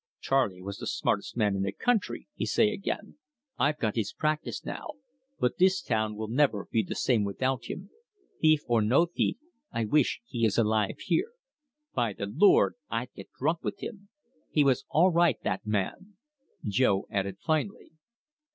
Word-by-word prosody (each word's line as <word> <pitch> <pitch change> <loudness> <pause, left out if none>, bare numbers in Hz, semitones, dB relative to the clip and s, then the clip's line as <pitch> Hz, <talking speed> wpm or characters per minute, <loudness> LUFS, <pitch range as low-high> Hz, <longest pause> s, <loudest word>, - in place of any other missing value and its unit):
'Charley 110 -10 0
was 100 +1 -6
the - - -5
smartes' - - -1
man 105 -4 +2
in 95 - -1
the 100 0 0
country,' 215 - -1
he - - -4
say 215 -2 +3
again. 210 +5 -4 0.4
'I've 150 +1 +2
got 110 -6 -1
his 105 -3 -1
practice 155 +3 -2
now, - - -5 0.5
but 125 - 0
this 190 +1 +5
town 110 -2 -1
will 110 +1 -4
never 120 -4 +1
be 115 - +3
the 100 - -5
same 115 -5 +2
without 130 +5 -1
him. 190 +8 -7 0.5
Thief 155 -1 +4
or 115 -2 +2
no 125 +11 +4
thief, 175 +6 -1 0.3
I 115 -1 -1
wish 140 +5 +2
he 120 -1 -4
is 110 -3 +2
alive 110 -2 +2
here. 440 +7 0 0.6
By 120 -4 0
the 100 - -4
Lord, 160 - +4
I'd 115 +2 -3
get 95 - -11
drunk 160 +5 0
with - - -3
him!' 200 -3 -7 0.4
He 150 - +3
was 135 -1 +2
all 180 +4 +4
right, 170 -6 +3
that 95 +3 -2
man," 105 - -2 0.5
Jo 100 -2 +2
added 100 -1 -2
finally. 160 +5 -2
125 Hz, 170 wpm, -29 LUFS, 105-160 Hz, 0.6 s, this